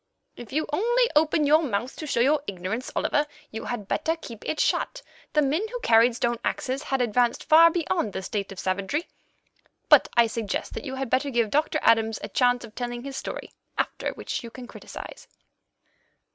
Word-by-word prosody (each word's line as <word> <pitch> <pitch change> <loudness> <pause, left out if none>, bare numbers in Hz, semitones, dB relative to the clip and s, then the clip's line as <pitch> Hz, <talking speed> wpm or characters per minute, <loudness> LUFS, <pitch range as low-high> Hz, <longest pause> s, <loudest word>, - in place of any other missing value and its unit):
"If 240 - -10
you 310 +3 0
only 475 +7 +2
open 305 0 +3
your 305 +3 +5
mouth 240 -3 -2
to 310 - -6
show 245 -4 +1
your 285 +4 +3
ignorance, 195 +6 -4
Oliver, 295 +1 +1 0.2
you 220 - -6
had 225 -5 -4
better 320 +7 0
keep 235 -9 -10
it 310 - -2
shut. - - 0 0.3
The 300 - +4
men 290 +6 +1
who - - -5
carried 230 - +5
stone 240 -1 0
axes 265 +1 -2
had 270 -1 -1
advanced 240 +1 +1
far 330 +2 +7
beyond 335 - -1
the 190 - -4
state 200 0 -3
of 195 - -8
savagery. 200 - -1 0.8
But - - +7
I 235 - +7
suggest 225 -2 -3
that - - -6
you 265 -1 -4
had 265 -2 -4
better 280 +2 +2
give 235 -5 +1
Doctor 305 +1 +1
Adams 225 -1 +3
a - - -5
chance 245 -1 +2
of 220 - -15
telling 240 0 -4
his 275 0 -6
story, - - -6 0.2
after - - -1
which - - -5
you 235 - -7
can 245 +2 -10
criticize." - - -10
250 Hz, 190 wpm, -26 LUFS, 225-300 Hz, 0.8 s, far